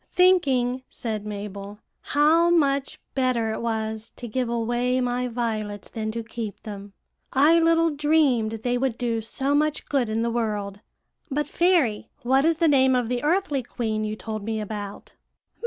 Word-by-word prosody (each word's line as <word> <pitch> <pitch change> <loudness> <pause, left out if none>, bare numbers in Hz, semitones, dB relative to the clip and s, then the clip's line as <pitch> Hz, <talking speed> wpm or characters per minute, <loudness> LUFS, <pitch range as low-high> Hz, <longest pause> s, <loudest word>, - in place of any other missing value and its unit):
"'Thinking,' 270 -9 +3
said 215 -3 -4
Mabel, 200 0 -6 0.2
'how 320 +4 +3
much 280 -5 +1
better 250 -4 +1
it - - -4
was 220 -1 -3
to 240 - -7
give 245 +2 -1
away 240 +2 0
my 250 0 0
violets 220 -4 -3
than 220 -2 -3
to 230 +1 -4
keep 225 -2 -6
them. 200 -2 -8 0.4
I 300 +5 +5
little 330 0 +3
dreamed 290 -7 +2
they 245 0 0
would 255 -3 -1
do 230 -2 -1
so 265 +5 -2
much 300 +1 +1
good 265 -5 0
in 220 +1 0
the 235 - 0
world. 210 -4 -2 0.5
But, 295 +1 -1
fairy, 335 - +2
what 265 +4 +3
is 330 0 +3
the 330 - +3
name 265 -3 +4
of 245 -2 0
the 245 -1 -1
earthly 300 -3 +1
queen 220 -3 -3
you 215 0 -2
told 215 -1 -5
me 220 +1 -2
about?' 205 -1 -6
245 Hz, 165 wpm, -25 LUFS, 220-280 Hz, 0.5 s, I